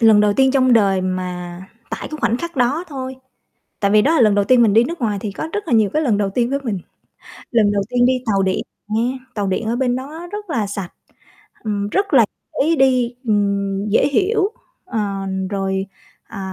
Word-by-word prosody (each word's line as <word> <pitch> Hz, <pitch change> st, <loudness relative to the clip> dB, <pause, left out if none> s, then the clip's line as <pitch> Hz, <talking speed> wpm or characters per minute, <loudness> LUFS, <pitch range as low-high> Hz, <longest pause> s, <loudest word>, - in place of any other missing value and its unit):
Lần 220 Hz, -2 st, +6 dB
đầu 210 Hz, -1 st, +3 dB
tiên 265 Hz, +2 st, +4 dB
trong 260 Hz, -2 st, +3 dB
đời 195 Hz, -4 st, +4 dB
mà 180 Hz, -1 st, -4 dB, 0.3 s
tại -, -, -5 dB
cái 310 Hz, -, -6 dB
khoảnh 235 Hz, -, +2 dB
khắc 340 Hz, +2 st, -6 dB
đó 270 Hz, +7 st, +1 dB
thôi, 260 Hz, -2 st, -6 dB, 0.6 s
tại 200 Hz, -2 st, +2 dB
vì 210 Hz, +1 st, +5 dB
đó 310 Hz, +7 st, +3 dB
là 320 Hz, -, +3 dB
lần 215 Hz, -3 st, +5 dB
đầu 205 Hz, 0 st, +2 dB
tiên 250 Hz, +3 st, +5 dB
mình 220 Hz, -3 st, +4 dB
đi 225 Hz, +2 st, +6 dB
nước 335 Hz, +5 st, -5 dB
ngoài 210 Hz, -4 st, 0 dB
thì 210 Hz, -, -3 dB
có 315 Hz, -, -5 dB
rất 415 Hz, -2 st, -3 dB
là -, -, -1 dB
nhiều 215 Hz, -3 st, +3 dB
cái 310 Hz, -, +1 dB
lần 230 Hz, -9 st, +2 dB
đầu 200 Hz, -1 st, 0 dB
tiên 240 Hz, +4 st, 0 dB
với 280 Hz, -, 0 dB
mình. 215 Hz, -6 st, -2 dB, 0.7 s
Lần 215 Hz, -4 st, +3 dB
đầu 200 Hz, -1 st, +1 dB
tiên 245 Hz, 0 st, +3 dB
đi 255 Hz, -, +4 dB
tàu 200 Hz, -3 st, +2 dB
điện 190 Hz, 0 st, 0 dB, 0.3 s
nghe, 235 Hz, +5 st, 0 dB, 0.2 s
tàu 205 Hz, -2 st, -1 dB
điện 190 Hz, +3 st, -1 dB
ở 230 Hz, +2 st, 0 dB
bên 250 Hz, -1 st, +1 dB
đó 300 Hz, +6 st, -7 dB
rất 415 Hz, -3 st, -6 dB
là 230 Hz, -9 st, 0 dB
sạch, 195 Hz, -3 st, -5 dB, 0.7 s
ừm, 205 Hz, -2 st, -2 dB
rất 395 Hz, -, 0 dB
là 240 Hz, -5 st, +7 dB, 0.4 s
dễ 330 Hz, +3 st, +2 dB
đi, 255 Hz, -3 st, +2 dB
ừm, 200 Hz, -1 st, 0 dB
dễ 205 Hz, -, +3 dB
hiểu, 390 Hz, +6 st, +1 dB, 0.4 s
ờ, 230 Hz, -, -3 dB, 0.5 s
rồi, 195 Hz, -1 st, -1 dB, 0.4 s
ờ, 215 Hz, -, -8 dB
230 Hz, 220 wpm, -19 LUFS, 200-265 Hz, 0.7 s, là